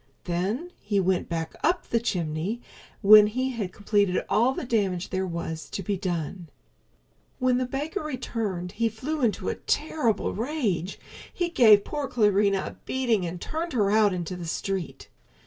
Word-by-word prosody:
Then 200 - -2
he 205 -1 0
went 185 -1 +1
back 165 -1 -3
up 345 +3 +2
the 230 - +1
chimney 180 0 -2 0.4
when 210 +1 +9
he 255 +5 -1
had 210 -7 -4
completed 205 -1 +1
all 230 +6 +3
the 265 - -4
damage 200 -7 -1
there 190 0 -1
was 160 -3 -5
to 195 - -4
be 200 +3 -1
done. 175 -2 -4 0.9
When 255 0 +2
the 255 - -1
baker 295 +9 -3
returned 225 -10 -3
he 225 +3 0
flew 280 +8 -4
into 230 -4 0
a - - 0
terrible 295 -7 0
rage. 220 - -2 0.3
He 350 -1 -1
gave 220 -10 +6
poor 295 -2 -3
Clarinha 205 -4 +2
a - - -8
beating 235 -8 0
and 175 +1 -6
turned 325 - -4
her 205 -5 +2
out 215 -1 +4
into 180 -1 -3
the 175 -2 -6
street. 190 +1 -3
205 Hz, 165 wpm, -26 LUFS, 180-250 Hz, 0.9 s, when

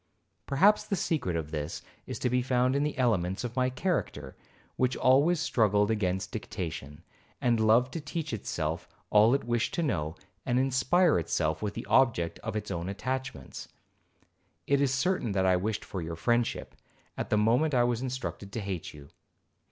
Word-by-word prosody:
Perhaps 195 +10 +4
the 200 - 0
secret 150 - -1
of 80 -2 -3
this 75 0 -4 0.2
is - - -4
to - - -1
be 125 +1 +2
found 125 +1 +1
in 140 - +2
the 150 -1 -1
elements 95 -7 +1
of 120 -1 -5
my 130 -1 +2
character, 130 - -2 0.4
which 130 0 +1
always 145 +7 +4
struggled 105 -6 +2
against 95 -3 -1
dictation, 85 - -6 0.4
and 120 -2 +2
loved 115 +4 +4
to 165 - -4
teach 150 -1 -4
itself 80 -6 -3 0.2
all 110 +4 +6
it 140 - -1
wished 120 -1 -1
to 170 - 0
know, 80 - -1 0.3
and 125 -1 0
inspire 135 - +3
itself 80 -1 -1
with 105 -1 -3
the - - -5
object 115 -11 +2
of - - -5
its 105 -1 -3
own 85 +2 -3
attachments. 130 - -5 1.0
It 140 0 +2
is 140 -2 +2
certain 135 - 0
that 95 -1 +1
I 95 -1 +4
wished 105 +4 -2
for 95 - -5
your 80 0 -5
friendship, 120 +7 0 0.4
at - - -4
the 105 - +2
moment 125 +8 +3
I 120 - +4
was 120 -1 0
instructed 130 -6 -5
to - - -2
hate 95 -5 -5
you. 70 -1 -12
115 Hz, 175 wpm, -29 LUFS, 95-130 Hz, 1.0 s, all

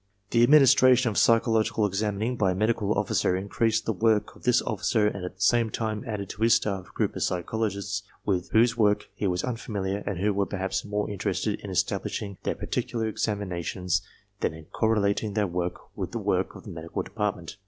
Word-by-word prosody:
The 115 - +4
administration 130 -2 +6
of 105 - -4
psychological 115 -1 +3
examining 105 +4 -1
by 95 -5 +2
a - - -6
medical 105 0 +1
officer 95 -2 +1
increased 110 +4 0
the 110 - 0
work 110 +1 +1
of - - -17
this 125 0 +5
officer 110 0 +1
and 100 -3 -1
at 90 0 -6
the 95 - -16
same 115 +2 +3
time 110 -1 -3
added 105 -3 -3
to 105 - -8
his 115 +1 +6
staff 95 -3 -2
a - - -18
group - - 0
of - - -4
psychologists 100 +1 -2 0.2
with 95 -2 0
whose 115 +1 +4
work 105 -3 +2
he 100 - -2
was 90 0 -1
unfamiliar 100 -5 -3
and 100 - -2
who 100 +3 +1
were 100 0 0
perhaps 95 -1 -2
more 105 0 -2
interested 100 -3 -2
in - - -8
establishing 100 -2 -2
their - - -2
particular 115 -2 -2
examinations 95 -4 -2 0.4
than - - -1
in 80 -1 -12
correlating 105 -1 +1
their 105 -1 +2
work 90 -1 -4
with - - -5
the - - -1
work - - 0
of - - -11
the - - -9
Medical 80 0 -5
Depart 105 -3 -2
ment. 85 +3 -10
105 Hz, 195 wpm, -27 LUFS, 95-110 Hz, 0.4 s, administration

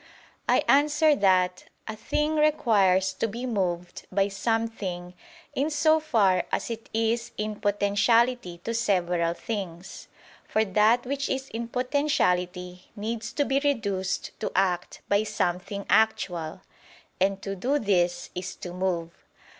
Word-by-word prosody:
I - - +4
answer 295 +2 +4
that, 185 -2 +2 0.2
A 220 - -4
thing 300 +8 -1
requires 200 -11 +3
to - - -1
be 235 +4 -5
moved 180 -7 -3
by 195 +1 +2
something 195 -4 -2 0.4
in 285 +2 0
so 315 +1 +3
far 220 -12 +2
as - - -2
it 225 -1 -7
is 225 +1 0
in 210 0 -3
potentiality 205 0 +2
to 230 - -3
several 180 -6 +1
things; 190 -4 -6 0.4
for 220 0 +1
that 215 +5 +3
which 275 +2 -2
is 265 0 -2
in 230 +1 -4
potentiality 180 -10 -1
needs 220 +1 -4
to 290 - +1
be 270 0 +2
reduced 200 -10 -1
to - - -3
act 180 -2 0
by 200 +1 +3
something 200 -1 -2
actual; 180 -6 +1 0.6
and 195 +1 +1
to 195 0 -3
do 255 +10 0
this 180 -8 0
is 180 +1 -5
to 175 - -8
move. 180 -2 -2
205 Hz, 135 wpm, -26 LUFS, 185-240 Hz, 0.6 s, I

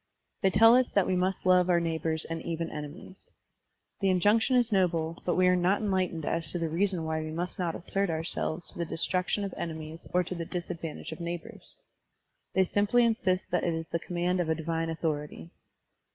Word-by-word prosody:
They 190 - +4
tell 225 +5 +7
us 255 -1 +3
that 200 -3 +2
we - - 0
m^i^ 185 +1 0
love 180 -1 +5
our 175 -1 +4
neighbors 160 -1 -1
and 165 0 -4
even 165 0 -3
enemies. 150 +6 -9 0.7
The 195 - +2
injunction 210 +7 +3
is 240 -2 +3
noble, 170 -4 +1
but 175 - +2
we 185 - +4
are 180 0 +5
not 180 +3 +2
enlightened 185 -6 -1
as 165 -2 0
to - - 0
the 165 -2 -1
reason 180 +1 0
why 160 0 -1
we 155 - -5
must 170 +4 -4
not 170 -2 -1
assert 195 +2 -1
ourselves 160 +1 -2
tQ - - -13
the 170 - -1
destruction 185 +5 0
of 195 - -4
enemies 160 0 -6
or 180 0 +3
to 180 - -5
the 170 -2 -4
disadvantage 165 -2 -5
of 160 - -7
neighbors. 170 0 -7 0.8
They 190 - +5
simply 205 +6 +3
insist 195 -5 0
that - - +1
it 170 -2 0
is 165 0 -5
the 170 - -1
command 175 +2 -1
of 170 -2 0
a 160 - +2
divine 165 +1 -2
authority. 150 - -3
175 Hz, 200 wpm, -29 LUFS, 165-185 Hz, 0.8 s, tell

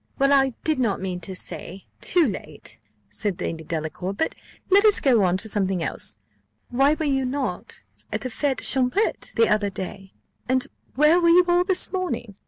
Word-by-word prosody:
"Well, 275 0 +3
I 270 -3 +3
did 310 -4 0
not 225 -6 0
mean 185 -1 -4
to 190 +2 -7
say 185 +1 -7 0.2
too 350 -3 +3
late," 155 - -7 0.3
said 175 - -4
Lady 165 -2 -4
Delacour; 160 +4 -4
"but 320 - -1 0.4
let 400 +2 +6
us 425 -2 +5
go 240 -7 +3
on 180 0 +2
to 205 - -1
something 195 -4 0
else. - - -1 0.5
Why 275 +4 +3
were 315 - -3
you 270 -2 +1
not 260 +1 -4 0.3
at - - -2
the 255 - -4
fète 270 +2 -1
champêtre 265 - 0
the 230 -1 +4
other 210 -1 +1
day? 190 0 -7 0.4
and 260 0 +2 0.3
where 305 +6 +5
were 340 - +4
you 355 +1 +6
all 350 0 +3
this 370 -1 +1
morning? 360 - -3
250 Hz, 185 wpm, -24 LUFS, 190-300 Hz, 0.5 s, let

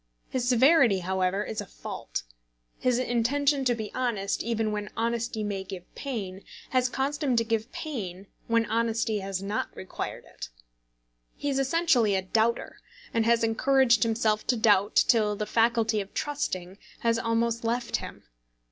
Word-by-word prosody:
His 245 -1 0
severity, 255 - +5
however, 190 +2 0
is 220 - -4
a - - -7
fault. - - -6 0.6
His 250 -1 +2
intention 270 +4 +1
to 245 -1 +3
be 220 -2 -6
honest, 220 -6 -1
even 225 -1 -1
when 210 0 -3
honesty 230 -1 -1
may 200 -2 -3
give 190 -2 -8
pain, 200 -8 -5 0.3
has 255 -1 +2
caused 280 +4 -2
him 260 -4 +2
to 230 - +3
give 225 +1 -2
pain 200 - -5 0.2
when 230 0 +3
honesty 225 -1 0
has 195 -1 -4
not 205 +2 -2
required 190 - -6
it. - - -9 0.9
He 285 - -2
is 270 - 0
essentially 270 - +3
a 190 - 0
doubter, 225 +4 0 0.3
and 230 -1 +2
has 235 0 +4
encouraged 240 0 +3
himself 220 -1 +1
to 250 - +2
doubt 205 -2 +3
till 215 -3 +4
the 210 +1 -3
faculty 230 -1 +2
of 195 - -10
trusting 195 -11 -3 0.2
has 230 -1 +2
almost 230 0 0
left 235 +1 0
him. - - -9
230 Hz, 155 wpm, -27 LUFS, 205-245 Hz, 0.9 s, severity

